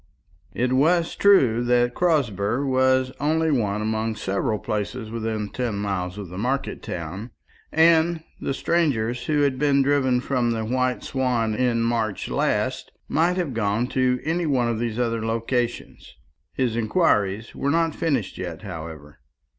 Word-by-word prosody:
It 125 +1 0
was 165 +5 +2
true 130 - +4
that 120 0 +2
Crosber 130 - +1
was 130 -1 +2
only 160 +2 +1
one 105 -6 0
among 110 +1 -1
several 105 +1 -1
places 110 +2 -4
within 110 -2 -3
ten 120 -3 -3
miles 95 -2 -3
of 100 -4 -7
the 90 +2 -7
market 130 +5 -2
town, 90 +7 -6 0.4
and 160 0 +4 0.2
the 135 - -2
strangers 125 -9 0
who 150 -2 +1
had 135 -3 +1
been 140 -1 +3
driven 135 -3 +2
from 125 -2 0
the 110 -1 -3
White 125 +2 0
Swan 125 -4 0
in 115 0 +1
March 115 -3 -1
last - - -1 0.2
might 175 +3 +1
have 170 -8 -1
gone 110 +1 0
to 130 -1 +1
any 165 +2 -1
one 130 -5 +2
of 115 -2 -1
those 115 -1 -2
other 115 -2 -1
localities. 115 +2 -3 0.4
His 125 -3 0
inquiries 110 - +1
were 140 - -2
not 165 +1 +2
finished 135 - -2
yet, 85 +1 -6
however. 80 -5 -8
120 Hz, 150 wpm, -24 LUFS, 110-140 Hz, 0.4 s, true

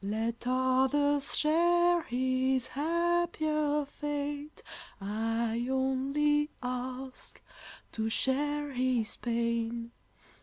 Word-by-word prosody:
Let 225 +4 -2
others 265 +3 +2
share 345 +2 +4
his 260 -1 0
happier 310 -2 0
fate, 290 +1 -5 0.4
I 225 +3 -1
only 275 +3 +1
ask 255 +1 -5 0.5
to 220 0 -2
share 290 +4 0
his 250 -3 0
pain! 235 0 -1
265 Hz, 75 wpm, -30 LUFS, 240-295 Hz, 0.5 s, share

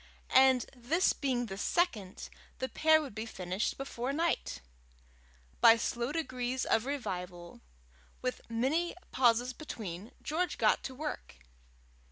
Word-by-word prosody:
and 260 -2 +6
this 290 +10 +2
being 255 -4 -1
the 195 -3 -6
second, 215 - -1 0.3
the 260 - -2
pair 315 +3 +4
would 275 - -8
be 220 +2 -5
finished 185 0 -2
before 270 -1 -3
night! 315 - -1 1.0
By 230 0 +8
slow 235 +3 -1
degrees 255 -5 -2
of 225 +3 +2
revival, 180 -10 -5 0.6
with 255 0 -3
many 275 +10 0 0.2
pauses 245 0 +3
between, 215 - -7
George 355 +4 -1
got - - +3
to 260 - -5
work. 300 +3 -5
250 Hz, 125 wpm, -32 LUFS, 220-285 Hz, 1.0 s, By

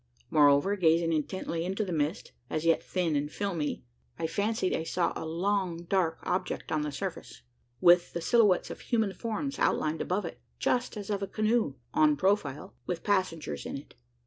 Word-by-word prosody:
Moreover, 145 +6 +5
gazing 165 -2 +3
intently 165 +1 -2
into 195 +4 -1
the 180 - -3
mist 155 +2 -1 0.2
as 155 +1 -2
yet 165 -1 +4
thin 175 -5 -1
and 145 +1 -1
filmy 165 - -2 0.3
I - - -2
fancied 205 +3 0
I 160 - -2
saw 170 +1 0
a 160 - -4
long 175 0 -1
dark 170 -2 +1
object 185 0 -2
upon 155 -1 +1
the 150 0 -2
surface, 135 - -6 0.4
with 175 -1 +6
the 170 - -3
silhouettes 205 0 +3
of - - -7
human 220 -5 0
forms 235 +8 -3
outlined 155 +1 +1
above 185 +2 -1
it - - -8 0.2
just 245 -2 0
as 205 0 -5
of 200 -1 -1
a 195 - -2
canoe 215 - +1 0.2
en 150 -1 +4
profile 190 -4 0
with 175 -2 -3
passengers 165 - -1
in - - -4
it. - - -12
175 Hz, 175 wpm, -29 LUFS, 160-200 Hz, 0.4 s, with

